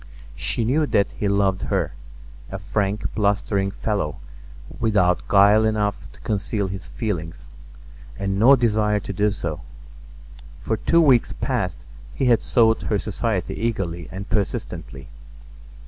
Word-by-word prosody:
She 115 - -1
knew 150 +6 +2
that 100 -6 +2
he 105 - -3
loved 100 -1 +1
her—a - - -5
frank, 100 0 -2
blustering 100 -1 +1
fellow 100 -6 -2 0.6
without 100 -6 +2
guile 105 +2 +5
enough 105 -2 -1
to - - -19
conceal 100 -1 -2
his 95 0 -6
feelings, 85 - -4 0.7
and 100 0 -2
no 130 +6 +7
desire 105 -4 +1
to 100 -1 -6
do 105 +3 +2
so. 85 -7 -4 1.0
For 110 - -2
two 170 +8 +3
weeks 130 -7 +4
past - - -3 0.3
he 135 - 0
had 120 -2 +4
sought 115 -2 +3
her 105 - +2
society 105 -1 -2
eagerly 95 -7 -3
and 95 +2 -6
persistently. 95 -9 -3
100 Hz, 130 wpm, -23 LUFS, 95-110 Hz, 1.0 s, no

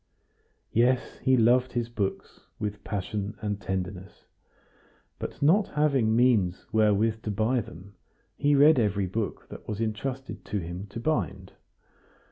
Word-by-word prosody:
Yes, 125 +3 +1
he 130 0 +3
loved 125 +2 +3
his 120 -1 -1
books 105 -5 -4
with 105 -1 -4
passion 105 +1 -4
and 105 -2 -3
tenderness; 95 +1 -5 0.9
but - - -5
not 195 +8 +4
having 135 -7 +2
means 115 -7 +2
wherewith 110 +1 +2
to 110 - -4
buy 110 +5 +1
them, 95 0 -12 0.4
he 145 0 +2
read 145 0 +6
every 100 -3 +1
book 105 +4 -4
that - - -11
was 105 -1 -4
entrusted 125 +4 -4
to 105 - -3
him 90 +2 -5
to 100 - -7
bind. 115 - -2
110 Hz, 135 wpm, -27 LUFS, 100-125 Hz, 0.9 s, read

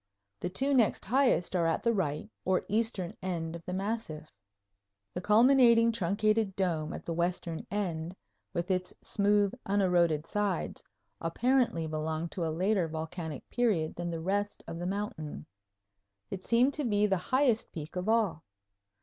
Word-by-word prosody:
The 180 - -2
two 270 +9 +1
next 240 -5 +3
highest 245 - +2
are 170 -2 +2
at 165 - 0
the 235 - +3
right, 175 -2 -1 0.2
or 185 0 +1
eastern, 210 -4 -1
end 170 -3 -3
of 170 - -9
the 180 - -3
massif. 190 -6 -4 0.8
The 180 - -3
culminating 230 +2 +6
truncated 215 0 +1
dome 165 -5 -1
at - - -7
the 170 - -2
western 170 -1 -2
end, 175 -4 -3 0.4
with 175 +2 -2
its 180 -1 -1
smooth, 205 -1 +2
uneroded 175 -6 +2
sides, 205 -3 -2 0.4
apparently 235 0 +1
belonged 155 +1 -3
to 175 - -3
a 165 - 0
later 185 +2 +1
volcanic 160 -1 -5
period 210 -11 +1
than 175 0 -3
the 165 -1 -3
rest 205 +4 -1
of 165 - -6
the 175 - -3
mountain. 190 - -4 0.9
It 185 - -5
seemed 245 +4 +3
to 300 - -2
be 210 -4 +2
the 195 -2 +2
highest 250 +4 +1
peak 155 0 -7
of 180 +3 -2
all. 215 -8 +1
185 Hz, 155 wpm, -30 LUFS, 165-215 Hz, 0.9 s, culminating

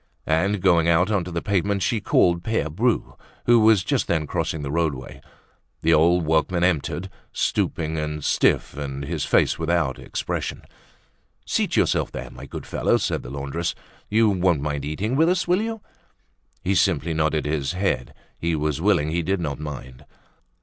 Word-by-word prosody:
And 90 +5 +1
going 85 -3 +4
out 85 +4 +3
on 100 -4 +1
to 90 - -7
the 85 0 -3
pavement 100 -1 0
she 105 +6 0
called 85 -2 +3
Pere 110 -9 -1
Bru 115 +9 0 0.3
who 120 -1 +6
was 110 -3 +5
just 135 +4 0
then 80 -2 0
crossing 75 +1 -2
the 70 - -4
roadway. 75 -6 -2 0.6
The 80 +1 +4
old 85 +2 +4
workman 80 +3 +1
entered, 90 +1 0 0.2
stooping 80 -1 -1
and 75 -1 -4
stiff - - +2
and 70 -1 -5
his - - -2
face - - +2
without 80 -4 0
expression. - - -4 0.8
"Seat - - 0
yourself - - +2
there, - - -7
my - - -10
good - - -7
fellow," - - +1
said - - -1
the - - -9
laundress. 70 +5 -3 0.3
"You 110 0 +4
won't 90 -5 +2
mind 75 -2 -2
eating 100 - -2
with 160 +4 +4
us, 180 -1 +1
will 180 +3 +3
you?" 225 -1 -4 0.8
He 95 - +1
simply 85 -4 +2
nodded 80 -1 0
his 75 0 -1
head. 95 +2 -1 0.2
He 85 -1 0
was 75 0 -1
willing; 85 -6 +2
he 85 +1 0
did 95 +3 -1
not 75 -4 -3
mind. 65 -4 -8
85 Hz, 170 wpm, -23 LUFS, 75-95 Hz, 0.8 s, who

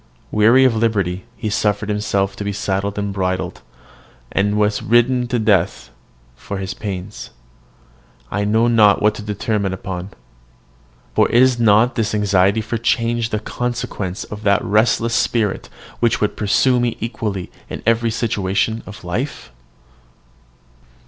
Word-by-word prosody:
Weary 115 +5 +5
of 125 -3 +3
liberty, 100 -4 0
he 110 -3 -3
suffered 105 -1 0
himself 100 -2 0
to 105 - -5
be 100 - -2
saddled 100 0 -2
and 100 -1 -2
bridled, 95 -1 -2 0.7
and 105 +1 +1
was 105 0 +1
ridden 120 +2 +2
to 125 - -1
death 100 -6 +1 0.4
for 100 - -6
his 95 -1 -4
pains. 100 0 -6 1.0
I 100 +1 -1
know 110 +3 +2
not 110 -4 +5
what 105 +1 +3
to - - -8
determine 105 -1 -2
upon. 95 0 -5 1.0
For - - +3
is 125 0 +4
not 115 +2 +4
this 110 -2 -1
anxiety 100 0 +2
for 110 +1 -3
change 115 -1 0
the 105 - -1
consequence 120 -4 -4
of 105 0 -8
that 100 -1 +2
restless 115 +2 +2
spirit 110 -5 0 0.3
which 120 -2 +2
would 105 - 0
pursue 125 +5 +2
me 120 -1 -1
equally 105 -5 -4 0.2
in - - -7
every 115 +1 +2
situation 110 -1 -1
of 105 +1 -10
life? 105 - -4
105 Hz, 140 wpm, -19 LUFS, 100-115 Hz, 1.0 s, Weary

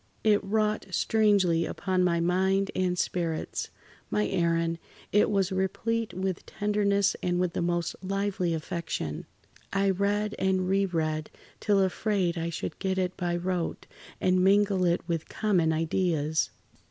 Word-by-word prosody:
It 210 -2 +3
wrought 215 +1 0
strangely 195 -4 +3
upon 185 +1 -1
my 170 -2 +2
mind 190 +3 +1
and 180 -1 0
spirits. 170 -3 -2 0.4
My 105 0 +1
Aaron, 165 -1 +1 0.3
it 210 - +4
was 195 -2 +1
replete 220 +4 -1
with 185 0 -3
tenderness 205 -1 +1
and 175 0 0
with 180 -2 0
the - - -1
most 175 -1 -1
lively 195 -3 -1
affection. 160 - -4 0.4
I 195 0 +2
read 205 +2 0
and 190 -1 +1
re 195 +1 +2
read 155 -3 -2 0.3
till 205 -2 +2
afraid 190 -2 0
I 165 0 -2
should 165 - -5
get 190 -1 -1
it 185 -1 -1
by 175 -2 -1
rote, 175 -1 -2 0.3
and 185 0 +3
mingle 195 -1 +4
it 170 -1 0
with 165 -2 -2
common 180 -7 +1
ideas." 160 -1 0
185 Hz, 140 wpm, -28 LUFS, 170-200 Hz, 0.4 s, it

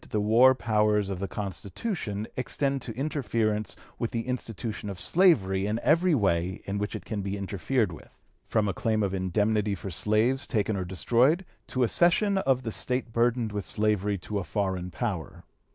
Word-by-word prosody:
262) - - -4
the 105 0 0
war 130 +3 +7
powers 105 -4 +1
of 95 - -4
the 100 - -2
Constitution 105 - -4
extend 135 +1 -1
to 120 - -6
interference 115 -7 -1 0.2
with 115 - -1
the 115 -1 -2
institution 115 -3 -4
of 95 -2 -6
slavery 100 - +3
in 110 +2 -1
every 170 +2 +4
way 95 -5 +1
in 100 +1 -2
which 105 +1 -3
it - - -7
can 105 -3 -3
be 100 +1 -3
interfered 100 +3 -1
with, 80 - -13 0.3
from 110 -2 +1
a 100 - 0
claim 110 +3 0
of 100 -1 -1
indemnity 105 +2 +1
for 95 +1 -7
slaves 110 +9 +1
taken 110 -3 0
or 95 -2 -2
destroyed, 125 - +2 0.2
to 130 - 0
a - - +3
cession 195 - +3
of 130 -7 +1
the 115 - -3
State 125 0 -2
burdened 120 -1 +1
with 105 -1 -3
slavery 105 -1 +1
to 100 +3 -4
a - - -3
foreign 95 -1 -2
power." 90 -2 -4
105 Hz, 185 wpm, -27 LUFS, 100-125 Hz, 0.3 s, war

